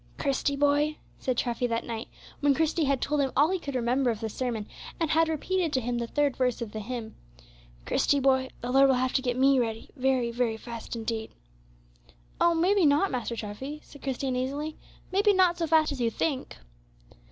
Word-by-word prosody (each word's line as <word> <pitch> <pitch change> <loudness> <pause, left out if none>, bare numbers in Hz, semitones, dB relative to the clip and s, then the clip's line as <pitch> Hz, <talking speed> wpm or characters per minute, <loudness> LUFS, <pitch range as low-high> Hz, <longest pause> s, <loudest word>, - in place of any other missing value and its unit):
"Christie, 280 0 0
boy," 290 +2 +2 0.2
said 255 -2 -1
Treffy, 240 +1 0
that 230 -1 -1
night, 230 0 -5 0.3
when 285 -1 +3
Christie 320 +1 +1
had 275 -2 +1
told 295 0 +1
him 270 -2 0
all 300 +5 +5
he 380 - 0
could 280 -5 -6
remember 250 +2 +1
of 225 -3 -1
the 225 -1 -3
sermon, 230 -2 -3 0.3
and 325 -2 0
had 325 +1 +3
repeated 335 +2 -1
to 260 - +3
him 240 0 -2
the 235 - -2
third 290 +1 +1
verse 250 -2 +1
of 230 -3 -5
the 220 - -5
hymn, 230 0 -5 0.7
"Christie, 285 - +2
boy, 260 -1 +2
the 245 - -3
Lord 270 +1 +6
will 265 - +4
have 255 +1 0
to - - +2
get 245 -1 -1
me 270 0 +5
ready 225 -2 -3
very 260 -3 +1
fast, 235 - -13
very 230 -3 +1
fast 230 +1 -7
indeed." 225 -1 -3 1.1
"Oh, 340 0 +4
maybe 370 +4 +3
not, 300 +6 +4
Master 240 -2 -2
Treffy," 230 +8 -6
said 285 - -15
Christie, 270 0 -2
uneasily, 275 +5 -2 0.4
"maybe 405 +2 +4
not 360 -2 +3
so 330 - 0
fast 315 -1 +4
as 275 -3 -4
you 235 - +2
think." 270 +3 -2
265 Hz, 205 wpm, -28 LUFS, 240-300 Hz, 1.1 s, Lord